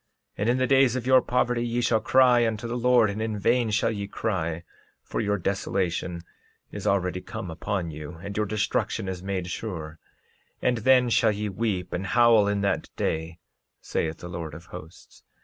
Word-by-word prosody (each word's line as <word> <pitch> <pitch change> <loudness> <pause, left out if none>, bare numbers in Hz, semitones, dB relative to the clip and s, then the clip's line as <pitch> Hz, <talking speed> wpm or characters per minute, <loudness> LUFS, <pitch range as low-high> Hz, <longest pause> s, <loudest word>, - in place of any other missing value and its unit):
13:32 - - -21
And 105 +3 +1
in 125 - +3
the 130 - +2
days 135 -1 +4
of 125 -2 -3
your 130 0 +6
poverty 125 -1 0
ye 120 0 -1
shall 115 -2 +2
cry 125 0 +4
unto 110 +1 -3
the 120 - -3
Lord; 120 -3 +4
and 105 +2 -5
in 110 -1 -2
vain 120 +3 +2
shall 105 +2 +1
ye 100 -2 -4
cry, 85 -6 -2 0.4
for - - -3
your 105 0 0
desolation 90 -2 -2 0.5
is 105 0 -5
already 90 -2 0
come 110 -6 -6
upon 90 0 -3
you, 75 +2 -8
and 100 +5 -8
your 105 0 0
destruction 105 -2 -1
is 95 -1 -4
made 95 -1 -3
sure; 80 -4 -6 0.6
and 125 -1 +1
then 125 +1 +4
shall 110 - +4
ye 105 0 -3
weep 95 -3 -2
and 95 +2 -3
howl 115 -2 +5
in 100 -1 0
that 100 - -1
day, 80 +1 -2 0.4
saith 80 -1 -2
the 90 - -9
Lord 85 -3 -6
of 85 - -11
Hosts. 85 -1 -12
105 Hz, 190 wpm, -26 LUFS, 90-120 Hz, 0.6 s, your